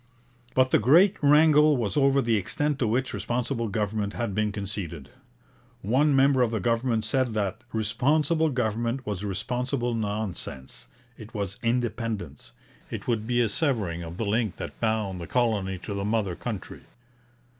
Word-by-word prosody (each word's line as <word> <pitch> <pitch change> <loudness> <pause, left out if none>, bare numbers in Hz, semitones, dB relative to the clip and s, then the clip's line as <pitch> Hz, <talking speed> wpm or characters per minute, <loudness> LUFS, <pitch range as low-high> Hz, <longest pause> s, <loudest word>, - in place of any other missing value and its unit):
But 130 0 +3
the - - +5
great 170 - +5
wrangle 150 0 +5
was 110 -5 -2
over 140 -1 +3
the 115 -1 +2
extent 145 +8 -1
to 120 - +1
which 125 +4 0
Responsible 120 0 -2
Government 105 0 -2
had 115 -4 -3
been 105 +1 0
conceded. 95 -8 -5 0.7
One 135 +8 +3
member 135 -1 +4
of 120 - +3
the 110 -1 -2
government 115 +1 0
said 130 -2 0
that 105 +2 -2
'Responsible 145 +9 +1
Government 120 0 -1
was 105 -2 -3
responsible 120 +5 -2
nonsense 105 - -4 0.3
it 110 +1 -11
was 100 -2 -3
independence. 115 - -2 0.4
It - - -6
would 110 -2 -1
be 120 0 +2
a 115 - +3
severing 105 - 0
of 85 +1 -7
the 115 - -2
link 105 -1 -1
which - - -5
bound 110 -5 -1
the 85 - -6
colony 105 -6 0
to 100 +3 -6
the 100 0 -3
mother 105 -4 0
country.' 110 -2 -6
115 Hz, 155 wpm, -26 LUFS, 100-130 Hz, 0.7 s, the